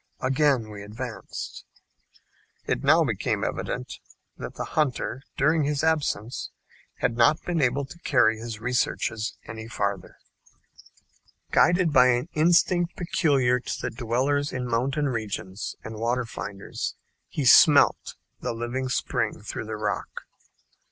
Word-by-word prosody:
Again 130 -4 +2
we 100 -1 -8
advanced. 105 +2 -7 1.0
It - - -1
now - - +5
became - - -1
evident - - -4 0.4
that - - -8
the - - -4
hunter, 135 -3 0 0.2
during 155 +3 +3
his 145 +1 0
absence, 140 -8 0 0.5
had 125 -2 -1
not 125 +7 +4
been 170 -3 -1
able 135 +2 +1
to 170 +6 -13
carry 110 -8 +3
his 115 -2 -6
researches 115 -2 -1
any 110 0 -8
farther. 100 -5 -3 1.3
Guided 175 -1 +4
by 130 -2 +7
an 125 +5 +1
instinct 175 +2 +3
peculiar 140 -8 +2
to - - -5
the - - -2
dwellers 130 +5 0
in 125 -1 -3
mountain 135 +5 0
regions 110 -5 -4
and 110 0 -7
water 120 +2 0
finders, 100 -3 -5 0.3
he - - -2
"smelt" - - +6 0.2
the 125 - -3
living 120 +3 -3
spring - - -1
through 110 - -5
the 110 0 -5
rock. 105 -1 -3
125 Hz, 130 wpm, -26 LUFS, 110-145 Hz, 1.3 s, by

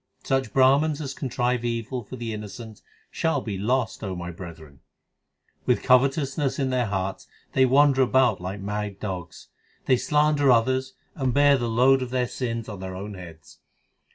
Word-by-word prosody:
Such 135 -4 0
Brahmans 140 +3 +3
as 140 -3 -4
contrive 125 -2 -1
evil 120 +1 -3
For 120 - -9
the 115 -2 -5
innocent 105 +1 -8 0.3
shall 160 -3 0
be 110 -6 -5
lost, 115 +5 -1
O 95 -3 -3
my 90 0 -5
brethren. 80 -5 -11 0.9
With 125 - +2
covetousness 135 +2 +2
in 135 -2 0
their 125 -2 +1
hearts 95 -1 -3 0.3
they 130 0 +4
wander 135 +1 +4
about 125 -6 +3
like 95 +2 -5
mad 105 0 -4
dogs; 95 -5 -6 0.4
They 130 - +4
slander 150 0 +2
others, 130 +3 +1 0.2
and 130 -3 -1
bear 145 0 +6
the 120 -3 -2
load 130 +4 +4
of 130 - -3
their 125 -1 0
sins 115 -2 -4
on 105 -3 -7
their 95 0 -6
own 100 +3 -6
heads. 85 -5 -12
125 Hz, 165 wpm, -25 LUFS, 100-135 Hz, 0.9 s, bear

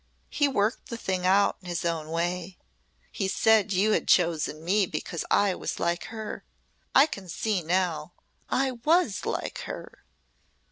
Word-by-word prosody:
He 290 - +2
worked 220 -3 0
the 235 - -5
thing 185 -4 -1
out 200 +2 +4
in 185 - -12
his 175 0 -2
own 160 -2 -2
way. 175 +2 -2 0.5
He 195 - -2
said 215 +1 +3
you 200 +3 +3
had - - +1
chosen 165 -3 +2
me 195 +2 +2
because 160 +1 -4
I 200 -2 +3
was - - -4
like 170 0 -1
her. 220 -1 -6 0.5
I 270 - +8
can 195 - -8
see 195 +3 -1
now! 170 -2 -1 0.4
I 265 0 +1
was 255 - +1
like - - -3
her!" - - -8
190 Hz, 155 wpm, -27 LUFS, 170-220 Hz, 0.5 s, I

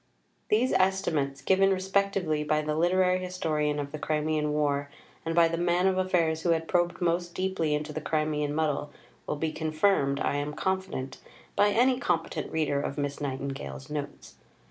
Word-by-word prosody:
These 230 +5 +3
estimates, 160 -8 +1
given 195 +4 +4
respectively 190 -4 0
by 155 0 +1
the 150 0 -1
literary 180 +3 +2
historian 155 -5 -1
of 140 -1 -4
the 155 - -6
Crimean 150 0 0
War 145 -1 0 0.3
and 165 0 -2
by 170 -1 +6
the 165 0 -2
man 175 +1 +2
of 190 -1 +2
affairs 170 -4 +1
who 175 - 0
had 165 -1 +1
probed 175 0 +1
most 175 0 0
deeply 185 -5 0
into 150 +1 -4
the 155 - -4
Crimean 150 -1 -1
muddle, 150 -2 0 0.4
will - - -1
be 155 +1 -2
confirmed, 155 -3 +1
I 145 - 0
am 145 +1 -3
confident, 190 -8 -3 0.4
by 205 - +5
any 250 +4 +3
competent 165 -7 -1
reader 145 -3 0
of 140 - -4
Miss 145 0 -3
Nightingale's 135 - -5
Notes. 145 -1 -6
160 Hz, 165 wpm, -28 LUFS, 150-185 Hz, 0.4 s, by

